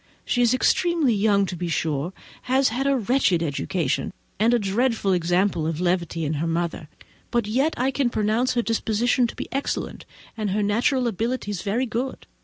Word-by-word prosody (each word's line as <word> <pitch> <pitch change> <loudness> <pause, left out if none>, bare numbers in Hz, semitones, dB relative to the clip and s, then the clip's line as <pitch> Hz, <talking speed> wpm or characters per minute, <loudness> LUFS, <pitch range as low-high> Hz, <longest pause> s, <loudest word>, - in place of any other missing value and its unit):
She 245 - +1
is 240 -2 +4
extremely 330 -1 +2
young, 200 -1 +3
to 185 - -5
be 175 0 -4
sure, 160 0 -1 0.4
has 265 +1 +4
had 260 +5 -1
a 275 -1 +3
wretched 215 -7 +2
education, 160 +1 -1 0.3
and 225 +3 +4
a 240 - +4
dreadful 215 0 +1
example 175 -1 +1
of 160 -1 -2
levity 175 -2 0
in 150 - -1
her 165 - 0
mother; 165 -2 -2 0.4
but 235 -2 0
yet 265 +9 +1
I 260 +2 +1
can 265 -1 +1
pronounce 225 +4 0
her 240 - +2
disposition 230 +2 +1
to - - -9
be - - -5
excellent, 275 +1 -3 0.3
and 215 -2 -2
her 205 +2 0
natural 245 +5 +1
abilities 225 -3 -2
very 225 +6 0
good. 245 +3 -4
215 Hz, 180 wpm, -24 LUFS, 180-245 Hz, 0.4 s, is